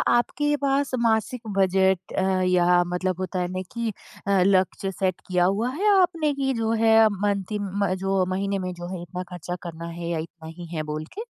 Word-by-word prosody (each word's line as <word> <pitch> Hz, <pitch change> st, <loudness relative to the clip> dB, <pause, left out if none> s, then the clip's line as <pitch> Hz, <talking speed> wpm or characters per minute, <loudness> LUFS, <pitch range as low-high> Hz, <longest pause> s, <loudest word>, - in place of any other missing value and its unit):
आपके 295 Hz, +5 st, +1 dB
पास 280 Hz, 0 st, +1 dB
मासिक 230 Hz, +1 st, +1 dB, 0.2 s
बजट 190 Hz, -1 st, +2 dB
अ, 190 Hz, 0 st, +2 dB
या 180 Hz, -1 st, +4 dB
मतलब 185 Hz, 0 st, -1 dB
होता 185 Hz, 0 st, -2 dB
है 180 Hz, -, 0 dB
ना 185 Hz, 0 st, -3 dB
कि 235 Hz, -1 st, -1 dB, 0.4 s
अ, 200 Hz, -2 st, +3 dB
लक्ष्य 195 Hz, 0 st, +2 dB
सेट 185 Hz, -1 st, -1 dB
किया 180 Hz, -1 st, +2 dB
हुआ 205 Hz, +6 st, +1 dB
है 405 Hz, +6 st, 0 dB
आपने 330 Hz, -4 st, +1 dB
कि 270 Hz, -1 st, 0 dB
जो 225 Hz, -2 st, -1 dB
है 225 Hz, 0 st, +7 dB
मंथ 200 Hz, -1 st, 0 dB
इम 200 Hz, -1 st, -1 dB, 0.2 s
जो 195 Hz, -1 st, +2 dB
महीने 195 Hz, +1 st, -1 dB
में 185 Hz, -1 st, -3 dB
जो 175 Hz, 0 st, -7 dB
है 175 Hz, -, -6 dB
इतना 180 Hz, +1 st, -6 dB
ख़र्चा 175 Hz, 0 st, -5 dB
करना 170 Hz, -1 st, -7 dB
है 170 Hz, 0 st, -6 dB
या 170 Hz, -, -1 dB
इतना 160 Hz, 0 st, -9 dB
ही 175 Hz, -, -7 dB
है 155 Hz, -, -1 dB
बोल 155 Hz, 0 st, -4 dB
के? 440 Hz, -, -5 dB
190 Hz, 200 wpm, -25 LUFS, 180-225 Hz, 0.4 s, है